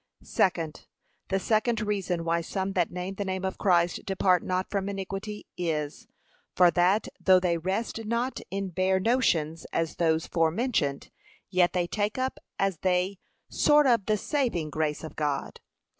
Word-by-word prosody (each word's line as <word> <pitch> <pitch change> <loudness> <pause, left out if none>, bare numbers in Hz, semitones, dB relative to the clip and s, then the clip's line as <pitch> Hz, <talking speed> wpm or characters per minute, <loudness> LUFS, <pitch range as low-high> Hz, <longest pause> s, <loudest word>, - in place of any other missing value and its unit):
Second, 165 -4 0 0.4
The 195 - 0
second 220 +3 +1
reason, 195 -5 -1
why 170 0 +1
some 190 +3 -3
that 175 -3 +1
name 180 +2 -4
the 200 - -3
name 190 -1 -3
of 190 - -3
Christ, 175 -3 +2
depart 185 -2 +2
not 185 0 -1
from 200 -1 -1
iniquity, 195 +2 -5
is, 155 -4 -2 0.5
for 180 -1 +6
that, 180 +5 +2
though 185 -1 +5
they 180 -2 +1
rest 190 +7 -2
not 235 +4 -1
in 195 0 -3
bare 185 +2 +1
notions, 180 -8 +1
as 165 -1 -1
those 160 -1 +2
forementioned, 165 - 0 0.4
yet 180 -2 +3
they 180 -1 +1
take 205 +5 -2
up 260 0 -2 0.2
as 195 -3 0
they, 185 +1 0 0.4
short 295 0 +5
of 235 -6 +3
the 215 -1 +2
saving 220 - -1
grace 155 -1 -1
of 155 -1 -8
God. 145 -2 -2
185 Hz, 160 wpm, -27 LUFS, 170-205 Hz, 0.5 s, for